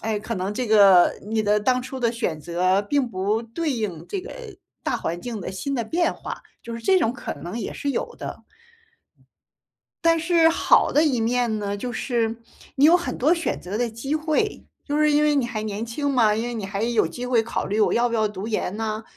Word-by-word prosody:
哎， 215 -1 -1
可 225 +2 -4
能 190 +1 -2
这 245 +3 -2
个 200 -5 +6
你 220 +1 0
的 210 0 +3
当 250 +4 +1
初 260 +1 -7
的 235 -2 +1
选 200 -9 -2
择 180 +5 +1
并 265 +4 0
不 205 +2 -1
对 290 +7 -3
应 190 -9 -4
这 390 - -3
个 375 - -10 0.5
大 - - 0
环 170 +1 -4
境 230 +1 -5
的 - - -5
新 235 +9 -3
的 240 - 0
变 335 +10 0
化， - - -7 0.2
就 230 0 -7
是 230 - -6
这 375 +11 +4
种 245 -9 +1
可 245 - -5
能 175 +9 -6
也 - - -4
是 285 - -3
有 - - -3
的。 - - -7 1.6
但 330 0 +4
是 330 0 +4
好 330 - +3
的 300 - +4
一 280 -7 +2
面 235 -1 +1
呢， 205 -1 -3
就 245 +4 -4
是 230 -1 -1 0.4
你 275 - +3
有 325 +3 +8
很 350 -1 0
多 295 +6 +3
选 335 -1 -1
择 195 +4 -5
的 240 0 +1
机 230 +6 -4
会， 310 +6 0 0.2
就 290 0 -1
是 305 0 +4
因 295 +1 +3
为 300 - +3
你 275 -4 +1
还 220 -3 -4
年 215 +1 -4
轻 285 +5 -2
嘛， 230 -6 +3
因 220 - -1
为 240 - -4
你 220 -4 -4
还 200 +1 -3
有 230 -1 +2
机 245 - -6
会 245 -2 +2
考 225 - -3
虑 210 +2 -1
我 - - +4
要 240 +1 +3
不 - - -2
要 215 -1 +2
读 200 0 -6
研 210 -3 -2
呢？ 220 0 -3
230 Hz, 245 characters per minute, -23 LUFS, 210-275 Hz, 1.6 s, 有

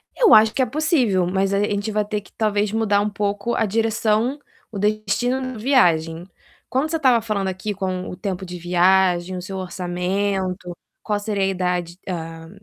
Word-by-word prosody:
Eu 465 -5 +5
acho 215 0 +7
que 265 - 0
é - - +4
possível, 255 - +1
mas 190 +2 0
aí 200 +1 +2
a - - -3
gente 205 +1 -2
vai 210 0 +1
ter 210 -1 -3
que, 190 - -20
talvez, 210 -1 0
mudar 210 -2 +2
um 210 - 0
pouco 205 +2 -2
a 220 - +1
direção, 225 +4 0 0.3
o 205 - -6
destino 215 +5 0
da - - -8
viagem. 175 - +2 0.4
Quando 275 +5 0
você 325 - 0
estava 255 -6 +4
falando 210 -3 -2
aqui 190 +3 -3
com 185 -1 -3
o - - -6
tempo 190 -1 -4
de 180 0 -7
viagem, 180 +1 +2
o - - -5
seu 190 +1 -6
orçamento, 185 0 -2 0.3
qual 210 -1 -1
seria 205 -1 -2
a - - +3
idade, 180 -2 -2
hã, 165 -2 -6
200 Hz, 190 wpm, -22 LUFS, 180-220 Hz, 0.4 s, acho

